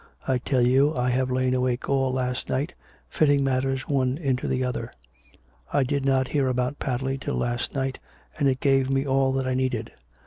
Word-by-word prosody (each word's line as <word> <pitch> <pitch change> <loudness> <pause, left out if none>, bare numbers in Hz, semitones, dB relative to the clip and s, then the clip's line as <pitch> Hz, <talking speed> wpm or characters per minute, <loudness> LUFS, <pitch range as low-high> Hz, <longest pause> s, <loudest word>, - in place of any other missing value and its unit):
I 130 -1 +2
tell 125 0 +1
you 135 +5 +3
I 125 0 +1
have 130 +1 +1
lain 130 0 +1
awake 125 -1 0
all 135 -1 +1
last 125 -1 -2
night, 140 +6 -1 0.3
fitting 145 -2 +2
matters 135 0 0
one 130 -2 +1
into 135 -6 -1
the 130 0 0
other. 125 -1 -3 0.8
I 140 - +3
did 135 +1 -1
not 130 -1 +2
hear 140 -3 +1
about 125 +2 -1
Padley 135 +1 -2
till - - -3
last 120 +2 -2
night, 135 -1 -2 0.4
and 140 -2 +3
it 130 -1 -1
gave 135 -1 +3
me 135 0 +1
all 135 -1 +2
that 135 0 -1
I 130 - 0
needed. 125 -3 -1
130 Hz, 195 wpm, -25 LUFS, 125-135 Hz, 0.8 s, you